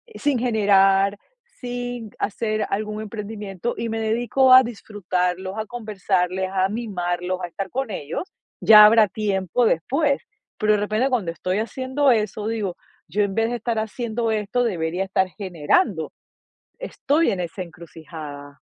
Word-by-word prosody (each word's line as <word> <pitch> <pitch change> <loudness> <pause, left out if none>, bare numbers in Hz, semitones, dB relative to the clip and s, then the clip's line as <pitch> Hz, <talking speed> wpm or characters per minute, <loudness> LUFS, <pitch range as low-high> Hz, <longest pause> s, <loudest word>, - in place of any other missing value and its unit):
sin 285 -4 0
generar, 200 -4 +3 0.3
sin 245 - -6
hacer 215 0 -1
algún 215 +1 -2
emprendimiento 210 0 -5
y 230 - -3
me 225 0 -2
dedico 240 +4 +2
a 260 0 +9
disfrutarlos, 190 -4 -3
a 215 - -4
conversarles, 190 -5 -1
a 190 0 +2
mimarlos, 185 -5 -3
a - - -2
estar 190 +2 -6
con 265 -4 -3
ellos. 155 - -4 0.4
Ya 215 -1 +9
habrá 220 -1 +6
tiempo 200 +2 0
después". 275 - +1 0.4
Pero, 215 0 +3
de 210 - +2
repente, 215 +6 0
cuando 210 -10 0
estoy 185 +4 -2
haciendo 260 +4 +1
eso 215 -2 -1
digo: 210 -5 -2 0.3
"Yo, 205 +7 -1
en 200 - -2
vez 225 +1 +1
de 240 - -2
estar 230 0 -2
haciendo 225 +1 -2
esto, 215 +3 0
debería 175 -4 -1
estar 190 -1 +1
generando". 185 - 0 0.7
Estoy 325 - 0
en 190 - -3
esa 175 +2 -5
encrucijada. 155 -4 -10
210 Hz, 145 wpm, -23 LUFS, 185-235 Hz, 0.7 s, a